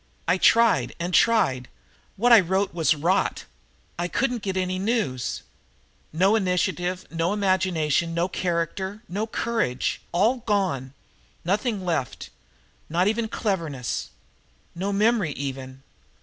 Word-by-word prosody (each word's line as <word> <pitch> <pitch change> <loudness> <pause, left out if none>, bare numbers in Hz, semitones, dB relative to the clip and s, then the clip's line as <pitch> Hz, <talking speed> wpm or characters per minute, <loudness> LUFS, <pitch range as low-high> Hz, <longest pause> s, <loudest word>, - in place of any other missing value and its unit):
I 180 +3 +2
tried 230 +3 +4
and 175 +2 -3
tried. 170 - +3 0.5
What 240 +5 +2
I 230 - +10
wrote 190 +2 0
was 165 -2 +2
rot. 170 +6 0 0.5
I 175 - 0
couldn't 245 +4 -1
get 190 -2 -3
any 185 0 -1
news. 190 - -1 0.7
No 190 +7 +3
initiative 180 -2 -1
no 170 +3 0
imagination 180 -5 +1
no 170 +1 +1
character 190 +4 -3
no 210 +5 -3
courage! 220 - -1
All 215 +9 +2
gone. 190 - -1 0.5
Nothing 205 +1 -1
left 160 -8 -3 0.6
not 175 +4 +2
even 220 +1 0
cleverness. 165 - -3 0.6
No 190 +4 -3
memory 205 -5 +2
even!" 135 -1 -6
185 Hz, 120 wpm, -24 LUFS, 165-210 Hz, 0.7 s, I